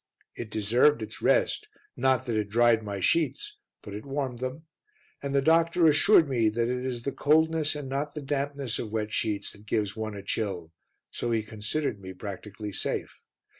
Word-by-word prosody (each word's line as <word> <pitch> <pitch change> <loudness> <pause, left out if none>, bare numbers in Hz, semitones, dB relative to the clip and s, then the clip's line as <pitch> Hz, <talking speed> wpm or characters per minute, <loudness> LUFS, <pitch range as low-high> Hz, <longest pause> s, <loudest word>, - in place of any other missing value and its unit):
It 115 - -6
deserved 115 +5 +3
its 110 - -7
rest, - - +2 0.3
not 130 0 +2
that 120 -3 -1
it 105 -2 -1
dried 115 +1 +4
my 100 -2 -5
sheets, 415 - 0 0.2
but 100 - -8
it 105 +1 -6
warmed 135 -3 -3
them; 130 +5 -5 0.6
and 140 0 -3
the 140 - +3
doctor 165 +2 +4
assured 160 +2 +6
me 120 -5 +2
that 115 +2 0
it 125 0 -2
is 125 -2 -3
the 140 - -1
coldness 155 +2 +2
and 145 -2 -5
not 140 +3 -3
the 150 - -5
dampness 140 -3 -2
of 110 - -5
wet 110 -1 -2
sheets 105 -3 -1
that 105 +1 -15
gives 105 -2 0
one 110 -1 -4
a 100 - -7
chill, 95 -6 -3 0.4
so 120 - -3
he 115 -2 +1
considered 110 +3 -2
me 95 -1 -8
practically 100 +2 -7
safe. - - -3
120 Hz, 185 wpm, -28 LUFS, 105-145 Hz, 0.6 s, assured